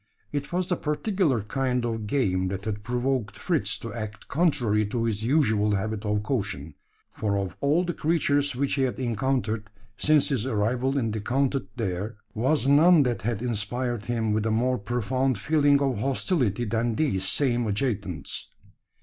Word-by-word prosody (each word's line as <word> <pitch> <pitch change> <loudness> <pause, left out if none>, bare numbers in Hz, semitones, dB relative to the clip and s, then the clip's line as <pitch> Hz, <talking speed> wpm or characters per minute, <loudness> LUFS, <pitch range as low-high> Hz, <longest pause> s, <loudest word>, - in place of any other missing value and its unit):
It 145 -1 -3
was 180 0 0
the 180 - 0
particular 150 - 0
kind 125 +1 -1
of 115 -2 -3
game 95 -8 +1
that 95 +1 -4
had 105 -1 -3
provoked 125 0 -1
Fritz - - 0
to - - -7
act 110 -2 -6
contrary 125 -10 +2
to 115 +2 -2
his 110 -2 -1
usual 110 -6 +2
habit 110 +2 -3
of 105 0 0
caution; 100 - -3 0.4
for 100 -2 0
of 95 -2 -3
all 150 +5 +3
the 175 - -2
creatures 145 -4 +1
which 140 +2 0
he 140 - +1
had 130 -4 0
encountered, 115 -3 -1 0.3
since 155 -1 +3
his 130 -4 0
arrival 125 +4 0
in 115 -5 0
the 110 0 -3
counted 135 0 0
there, 105 0 -3 0.2
was 130 +4 +1
none 150 +3 +6
that 120 -3 -1
had 115 +1 -2
inspired 120 0 -2
him 115 -3 0
with 110 +1 0
a - - +1
more 125 +3 +1
profound 125 +4 0
feeling 145 +4 +3
of 135 -6 0
hostility 125 - 0
than 115 +1 0
these 95 -11 0
same 120 0 +1
adjutants. 100 - -2
120 Hz, 165 wpm, -26 LUFS, 105-135 Hz, 0.4 s, none